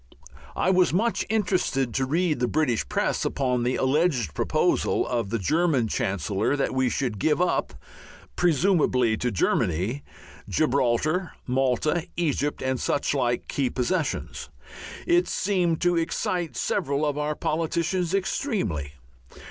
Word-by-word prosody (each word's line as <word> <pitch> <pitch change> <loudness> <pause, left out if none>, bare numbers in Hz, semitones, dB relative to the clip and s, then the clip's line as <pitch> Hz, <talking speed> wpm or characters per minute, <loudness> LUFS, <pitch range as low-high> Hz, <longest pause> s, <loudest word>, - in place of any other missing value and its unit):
I 185 - +2
was 185 -1 +4
much 220 +7 0
interested 180 - 0
to 130 -1 0
read 160 0 +1
the 125 - +1
British 120 - 0
press - - 0
upon 125 -3 0
the 125 +2 0
alleged 130 - +1
proposal - - +1
of 115 -5 -1
the 115 - 0
German 145 - +1
Chancellor 100 - -1
that 140 - -1
we 130 -1 +1
should 120 -5 -2
give 150 - +2
up 180 0 0 0.6
(presumably 155 - +2
to 125 - -1
Germany) 100 - 0 0.5
Gibraltar, 150 +5 +1
Malta, 135 +6 0
Egypt, 145 -4 -1
and 130 -1 -1
suchlike 130 -4 0
key 135 -3 0
possessions. 150 +5 -2 0.6
It 350 +1 +3
seemed 180 -5 0
to 175 0 +2
excite 165 -3 -2
several 145 -5 0
of 145 0 -1
our 150 +1 -1
politicians 170 +4 -1
extremely. 185 - -2
145 Hz, 125 wpm, -25 LUFS, 125-175 Hz, 0.6 s, was